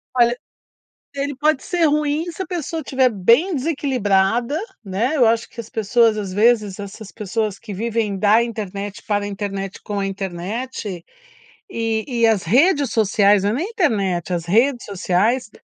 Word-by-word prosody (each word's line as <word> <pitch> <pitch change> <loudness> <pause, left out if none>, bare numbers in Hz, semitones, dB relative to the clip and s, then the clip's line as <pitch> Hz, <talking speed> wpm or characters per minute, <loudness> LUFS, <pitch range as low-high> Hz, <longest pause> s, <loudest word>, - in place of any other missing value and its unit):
Olha, 240 0 +4 0.8
ele 280 0 -3
pode 300 0 +1
ser 350 -2 -1
ruim 300 +1 +1
se 380 - -7
a - - -2
pessoa 330 -2 -3
estiver 260 -2 +2
bem 235 - +3
desequilibrada, 245 -4 +1 0.3
né? 215 +9 -1
Eu 250 - +4
acho 230 0 +1
que 235 - -13
as 225 -1 -7
pessoas, 225 -1 +2
às 200 -3 -4
vezes, 210 -2 +2
essas 205 +1 -8
pessoas 210 -1 -3
que 215 -3 -8
vivem 220 -1 -1
da 215 +4 +4
internet, 205 -3 -5
para 205 -1 -1
internet, 195 -1 -5
com 205 -1 -3
a 195 - -1
internet. 195 +1 -5 0.7
E 225 -4 -1 0.2
e - - +7
as 215 -4 +2
redes 280 - +3
sociais, 205 -2 +3
não 205 - +1
é - - -1
nem 335 - -2
internet, 200 - 0
as 170 -2 -2
redes 240 +7 +2
sociais 205 +5 0
225 Hz, 160 wpm, -20 LUFS, 200-260 Hz, 0.8 s, e